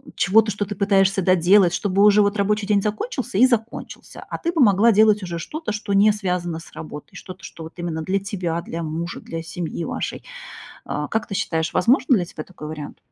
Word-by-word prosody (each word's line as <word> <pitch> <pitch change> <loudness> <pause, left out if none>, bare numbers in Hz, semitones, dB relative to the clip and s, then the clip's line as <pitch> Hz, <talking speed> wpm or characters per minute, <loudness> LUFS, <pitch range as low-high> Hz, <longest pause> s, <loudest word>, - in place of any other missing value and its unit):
чего-то, 215 +2 +3
что 205 +1 -2
ты 205 - -5
пытаешься 195 -1 +2
доделать, 185 0 +4
чтобы 200 0 +1
уже 210 0 +6
вот 200 +1 0
рабочий 210 +1 0
день 205 -2 +3
закончился 215 - -3
и 250 - +8
закончился, 235 -2 -4
а - - -4
ты 340 - -1
бы 330 - -1
могла 210 +1 +5
делать 215 0 +4
уже 170 -1 -4
что-то, 310 - -5
что 205 -1 -3
не 205 +2 +5
связано 180 -5 -3
с 165 - -15
работой, 150 -2 -9
что-то, 185 0 -10
что 165 - -9
вот 160 - -10
именно 170 -2 -3
для 190 +4 0
тебя, 180 -4 -3
для 165 +1 -5
мужа, 165 +2 -4
для 165 0 -6
семьи 170 0 -5
вашей. - - -4 0.6
А, 150 0 -3
как 225 +6 -2
ты 200 - -5
считаешь, 160 -2 -1
возможен 255 +7 +3
для 180 -5 0
тебя 155 -2 -8
такой 165 -5 -10
вариант? 155 -2 -7
195 Hz, 205 wpm, -22 LUFS, 170-210 Hz, 0.6 s, и